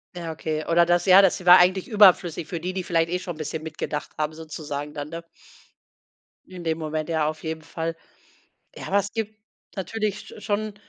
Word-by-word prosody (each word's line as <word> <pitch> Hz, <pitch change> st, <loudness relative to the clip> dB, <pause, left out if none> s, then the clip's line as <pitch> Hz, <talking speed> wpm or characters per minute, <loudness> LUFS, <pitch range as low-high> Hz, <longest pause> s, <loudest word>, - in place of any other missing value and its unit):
Ja, 170 Hz, -2 st, -5 dB
okay. 155 Hz, 0 st, -3 dB
Oder 170 Hz, 0 st, +4 dB
das 175 Hz, 0 st, +2 dB
ja, 190 Hz, +2 st, +8 dB
das 185 Hz, -1 st, +2 dB
war 180 Hz, +1 st, +9 dB
eigentlich 185 Hz, +1 st, +3 dB
überflüssig 180 Hz, -6 st, +4 dB
für 170 Hz, 0 st, -4 dB
die, 180 Hz, +3 st, -3 dB
die 185 Hz, -1 st, -3 dB
vielleicht 165 Hz, -1 st, +1 dB
eh 180 Hz, -, 0 dB
schon 180 Hz, -1 st, -6 dB
'n -, -, -15 dB
bisschen 155 Hz, +1 st, -5 dB
mitgedacht 155 Hz, -1 st, -5 dB
haben, 155 Hz, 0 st, -1 dB
sozusagen 150 Hz, -2 st, -6 dB
dann, 145 Hz, 0 st, -6 dB
ne? 165 Hz, 0 st, -7 dB, 1.2 s
In 180 Hz, -2 st, -10 dB
dem 160 Hz, -1 st, -1 dB
Moment, 155 Hz, 0 st, -3 dB
ja, 155 Hz, -2 st, +1 dB
auf 155 Hz, 0 st, -5 dB
jeden 160 Hz, 0 st, -4 dB
Fall. 165 Hz, +1 st, -4 dB, 0.8 s
Ja, -, -, -8 dB
aber 200 Hz, -, +2 dB
es 200 Hz, 0 st, -2 dB
gibt 220 Hz, -1 st, -4 dB, 0.4 s
natürlich 205 Hz, +2 st, -2 dB
sch -, -, -12 dB
schon 210 Hz, 0 st, -2 dB
170 Hz, 200 wpm, -24 LUFS, 155-185 Hz, 1.2 s, war